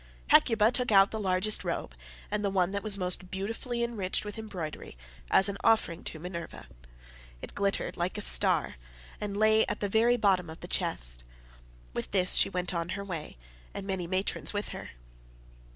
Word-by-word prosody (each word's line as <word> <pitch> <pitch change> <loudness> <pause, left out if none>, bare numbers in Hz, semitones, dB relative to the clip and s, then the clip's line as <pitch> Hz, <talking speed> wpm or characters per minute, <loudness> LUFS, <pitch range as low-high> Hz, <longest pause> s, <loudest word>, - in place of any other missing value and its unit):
Hecuba 225 -1 +4
took 250 -2 +1
out 195 -1 +5
the 220 - -4
largest 195 +1 +2
robe, - - -4 0.4
and 210 0 -1
the 200 - +1
one 190 -1 +1
that 200 0 -3
was 210 -1 0
most 180 0 -1
beautifully 225 +5 -4
enriched 210 -5 -3
with 210 +2 -7
embroidery, 175 - -7 0.3
as 190 - +7
an 200 0 -4
offering 200 -7 +2
to - - -4
Minerva: 170 +1 -8 0.7
it - - -9
glittered 200 -1 -1
like 175 +1 -2
a - - -3
star, - - +4 0.4
and 205 -1 -4
lay 220 +1 +4
at - - -3
the 205 - -1
very 230 +4 +2
bottom 190 -6 +1
of 160 - -10
the - - -7
chest. - - -1 0.7
With 120 - -4
this 185 -2 +4
she - - +6
went 180 -1 -3
on 170 0 -3
her 200 - -5
way 170 - -7 0.4
and 195 - -5
many 190 -3 -3
matrons 185 +4 -2
with 205 0 -3
her. - - -8
195 Hz, 180 wpm, -29 LUFS, 180-210 Hz, 0.7 s, as